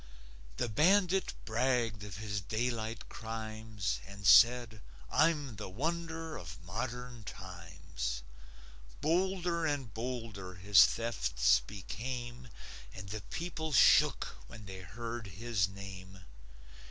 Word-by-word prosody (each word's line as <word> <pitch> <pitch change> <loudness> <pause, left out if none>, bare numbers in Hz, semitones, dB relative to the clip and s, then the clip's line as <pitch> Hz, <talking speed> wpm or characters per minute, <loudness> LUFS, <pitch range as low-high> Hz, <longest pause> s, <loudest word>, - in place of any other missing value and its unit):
The - - 0
bandit 185 - +3
bragged 115 -2 +1
of 100 -3 -7
his 105 -2 -3
daylight 110 +2 -2
crimes 110 - -4
And 100 0 -9
said: 120 +1 +6 0.3
"I'm 150 -7 +2
the - - -5
wonder 165 - -3
of 80 -1 -8
modern 120 +5 -5
times." 85 -10 -6 0.8
Bolder 175 +1 +1
and 135 -8 -2
bolder 110 -6 -5
his 95 +2 +7
thefts 110 - +2
became, 120 +4 -6 0.5
And 95 +1 -8
the 110 +1 -4
people 160 - -4
shook 110 - +5
when 110 -2 -11
they 95 -1 -8
heard 115 +5 -6
his 100 +1 0
name. 95 -1 -9
110 Hz, 105 wpm, -33 LUFS, 100-130 Hz, 0.8 s, his